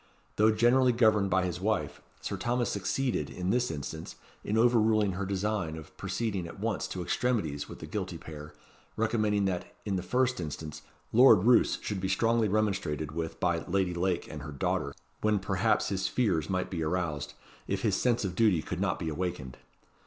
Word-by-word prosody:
Though 110 +1 +5
generally 120 +3 +4
governed 110 -4 +3
by 95 -1 +2
his 90 0 -4
wife, 75 -8 -1 0.2
Sir - - -3
Thomas 120 +5 0
succeeded, 100 - -1
in 90 +1 -2
this 125 0 +1
instance, 80 +1 -6 0.3
in 105 - -1
over 120 +1 +5
ruling 110 -2 +3
her 95 +1 -3
design 100 -4 -1
of 80 - -11
proceeding 100 -7 -2
at 85 - -10
once 110 +1 -1
to 90 - -4
extremities 85 -11 -1
with - - -8
the - - -8
guilty - - -4
pair, 75 -1 -9 0.5
recommending 110 -2 +1
that, 90 -2 -3
in 100 -2 0
the - - -2
first 125 +6 +1
instance, 75 -1 -6 0.3
Lord 115 -5 +7
Roos 120 +1 +4
should 100 -3 -3
be 95 - -1
strongly 115 +3 +2
remonstrated 95 -8 -1
with 80 +1 -4
by 85 -2 +1
Lady 95 -1 +1
Lake 90 0 -1
and 75 -1 -7
her 75 +1 -7
daughter, 70 0 -1 0.3
when 105 -1 +2
perhaps 100 +3 +1
his 95 -1 -1
fears 95 -11 0
might 95 -1 -1
be 85 -3 -2
aroused, 80 -3 -2 0.3
if 100 -1 -2
his 105 -4 +2
sense 120 0 +1
of 95 - -2
duty 95 -5 +3
could 90 +3 -4
not 95 -3 +1
be 80 - -4
awakened. 75 -6 -3
95 Hz, 185 wpm, -29 LUFS, 85-110 Hz, 0.5 s, Lord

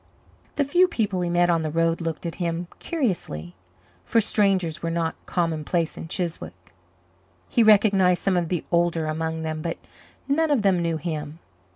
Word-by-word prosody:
The 290 - +2
few 350 +6 +4
people 205 - -1
he 175 - -1
met 175 0 +3
on 165 -1 +2
the 155 - -2
road 165 +2 +1
looked 165 0 -4
at 165 - -3
him 170 0 -1
curiously, 175 - -3 0.5
for 230 - +2
strangers 195 -6 +1
were 165 - -2
not 165 -1 -1
commonplace 165 -1 -1
in - - -7
Chiswick. 160 - -5 0.7
He 235 - +2
recognized 200 -4 +4
some 195 -2 +2
of 175 -2 0
the 175 -3 -2
older 170 -2 +2
among 160 +1 -2
them 155 -1 -3
but 165 +1 -3 0.5
none 315 +3 +2
of 275 -7 +2
them 190 -3 +3
knew 165 -1 0
him. 155 -1 -5
170 Hz, 170 wpm, -24 LUFS, 160-195 Hz, 0.7 s, few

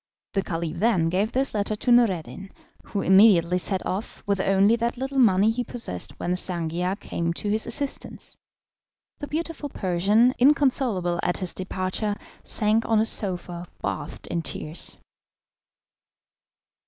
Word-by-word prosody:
The 195 - +1
Caliph 165 -2 -4
then 190 -7 +2
gave 195 +6 0
this 270 +2 -1
letter 210 0 -1
to 245 +4 -1
Noureddin, 195 -5 +1 0.4
who 200 - -3
immediately 185 -3 +5
set 190 +1 -3
off, 195 +4 -5
with 200 -1 0
only 195 +3 +3
what 235 +1 -2
little 270 +2 -2
money 210 -2 +4
he 245 +2 -2
possessed 230 - -4
when 175 - -2
Sangiar 180 +1 -2
came 170 0 -3
to 205 +4 -3
his 220 +1 +1
assistance. 275 +4 -1 0.8
The 290 - -6
beautiful 320 -1 -4
Persian, 205 +5 +2
inconsolable 250 -10 +2
at 180 - -1
his 185 -2 -1
departure, 185 +2 -3 0.3
sank 215 +1 +2
on 225 -1 +3
a 220 - +2
sofa 180 -4 +1
bathed - - -5
in 170 - -3
tears. 155 0 -2
200 Hz, 140 wpm, -24 LUFS, 180-230 Hz, 0.8 s, immediately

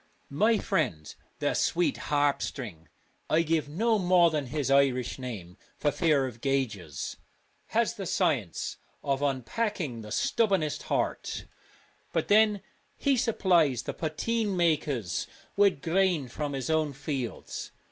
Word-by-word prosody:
My 215 +10 +3
friend, 155 - -1
' - - -39
the - - +1
sweet 175 +1 +1
Harp 145 -1 +2
String' 85 - -5 0.4
(I 165 +2 +4
give 160 -2 0
no 220 +8 +2
more 175 -2 +5
than 150 -4 -1
his 140 0 -1
Irish 135 -2 +2
name 105 -8 -7 0.2
for 145 - +1
fear 150 -5 +2
of 120 -3 -7
gaugers), 110 - -2 0.5
has 230 0 +1
the 195 -3 -5
science 145 - 0 0.3
of 140 0 0
unpacking 140 - -1
the 105 -1 -9
stubbornest 175 - +1
heart, - - -1 0.7
but - - 0
then 210 -1 +4 0.3
he 280 -2 +2
supplies 175 - +2
the - - -4
poteen 200 +6 -1
makers 150 - 0 0.3
with 200 -8 +3
grain 175 -4 +2
from 145 +4 -4
his 135 +3 -2
own 155 -2 +1
fields. 135 -3 -4
150 Hz, 135 wpm, -28 LUFS, 130-185 Hz, 0.7 s, more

